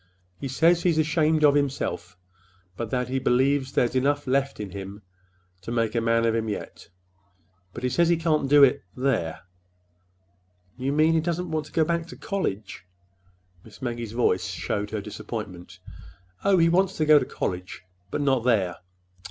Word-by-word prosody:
He 140 - -4
says 165 +6 +3
he's 170 -3 +2
ashamed 155 0 +2
of 145 -1 +6
himself, 140 -9 -2 0.6
but 115 +2 -4
that 125 0 -1
he 130 +1 -1
believes 130 +2 +1
there's 120 - +1
enough 140 +3 +1
left 135 0 0
in 105 -3 -5
him 100 +1 -8 0.6
to 95 - -7
make 115 -2 0
a 115 - 0
man 115 0 +2
of 115 - +2
him 110 -1 -1
yet. 105 - -7 0.8
But 120 - -9
he 125 - +1
says 170 +6 +2
he 170 - +3
can't 155 -4 0
do 145 0 +7
it—there." 125 -7 0 1.3
"You 130 +2 -2
mean—he 160 +2 +3
doesn't 170 +1 -3
want 155 -1 -2
to - - -17
go 160 - +2
back 170 +1 -1
to - - -11
college?" 105 - -4 0.8
Miss 110 - -15
Maggie's 120 -4 -4
voice 90 -6 +1
showed 90 +3 -3
her 110 -1 -3
disappointment. 100 -4 -7 0.7
"Oh, 195 -1 +4
he 165 -1 +5
wants 185 +3 +2
to 155 - +1
go 150 -1 +7
to - - -3
college—but 90 +3 -6
not 135 -4 +2
there." 100 -8 +1
130 Hz, 165 wpm, -25 LUFS, 105-155 Hz, 1.3 s, do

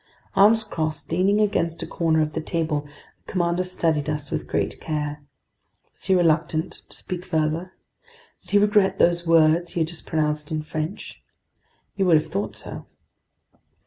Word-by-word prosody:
Arms 220 +3 +6
crossed, 160 -8 -3
leaning 190 +5 +3
against 170 -6 0
a - - -3
corner 160 -2 +1
of 155 0 -4
the 160 - -2
table, 155 -3 -1 0.4
the - - -7
commander 175 -1 +1
studied 160 -5 0
us 150 -2 -3
with - - -3
great - - -2
care. 150 -1 -3 0.7
Was - - -6
he 190 - +4
reluctant 160 -2 +2 0.2
to - - -11
speak 180 -1 -5
further? 165 +1 -1 0.7
Did - - -17
he 205 - +4
regret 205 -1 +3
those 175 0 +2
words 165 +1 +4
he 170 - -1
had 160 - +1
just 170 -1 -8
pronounced 150 -1 -1
in 155 -1 -2
French? 155 +4 -5 0.7
You 195 -2 +1
would 165 -3 +6
have 155 +1 -2
thought 195 +5 -3
so. - - -7
165 Hz, 165 wpm, -24 LUFS, 155-185 Hz, 0.7 s, Arms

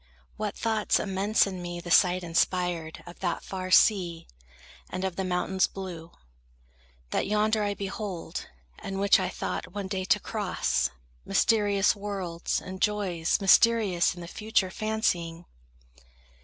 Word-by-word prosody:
What 210 -1 -4
thoughts 220 -2 +1
immense 200 +2 +2
in 190 -2 -5
me 175 0 -5
the 175 0 -7
sight 180 0 +4
inspired 170 -1 -1
Of 175 0 -12
that 175 -3 -2
far 185 -1 -5
sea, 180 -4 +4 0.6
and 185 - -4
of 190 -2 -2
the 190 - -2
mountains 185 +1 +1
blue, 175 -4 -7 1.0
That - - 0
yonder 215 +1 +2
I 205 -1 -1
behold, 195 -2 -5 0.3
and 195 0 -5
which 200 0 +5
I - - -1
thought 180 - -5
One 200 -1 -4
day 190 -1 -3
to 210 - +3
cross, 190 - -1 0.3
mysterious 205 -3 +2
worlds 195 -4 -3
and 185 0 -9
joys 195 -6 +1
Mysterious 195 -3 +4
in 175 - -9
the 170 - -7
future 210 -1 0
fancying! 175 -7 -1
190 Hz, 140 wpm, -27 LUFS, 175-205 Hz, 1.0 s, which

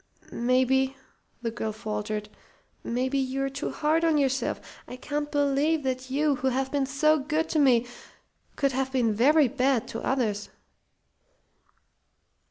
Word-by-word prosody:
"Maybe," 260 +2 +1 0.5
the 230 - -1
girl 220 -1 -3
faltered, 210 0 -4 0.6
"maybe 260 +3 -1
you're 270 +1 -1
too 280 +3 -4
hard 320 +2 +1
on 325 -2 +3
yourself. 270 -2 -1
I - - -7
can't 295 +3 -3
believe 290 +2 +1
that 260 0 -3
you, 285 +1 +1
who 265 - -1
have 265 +1 0
been 280 -2 0
so 305 +3 +3
good 305 +3 -1
to 315 - +1
me, 250 -4 +4 0.7
could 275 -2 +1
have 265 0 -1
been 240 -5 +1
very 285 +7 +4
bad 260 -2 +1
to 225 - -5
others." 220 -6 -1
265 Hz, 140 wpm, -27 LUFS, 250-285 Hz, 0.7 s, me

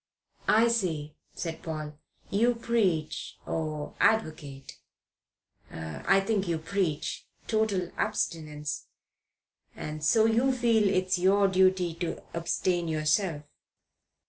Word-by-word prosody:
"I 225 +2 +5
see," 165 -10 -1 0.2
said 165 -2 -5
Paul. 155 -2 -5 0.4
"You 235 +4 +3
preach, 195 -10 -1
or 155 -2 -3
advocate 155 -10 0 0.9
I 80 - 0
think 200 -1 0
you 170 -1 0
preach 160 -2 -2 0.2
total 215 -5 0
abstinence, 150 -3 -2 0.9
and 155 0 -6
so 225 +9 +4
feel 230 -5 +3
it 185 -1 +1
your 195 +2 +4
duty 185 -2 +3
to 175 -2 -3
abstain 170 +1 0
yourself." 155 +1 +1
180 Hz, 95 wpm, -28 LUFS, 155-210 Hz, 0.9 s, I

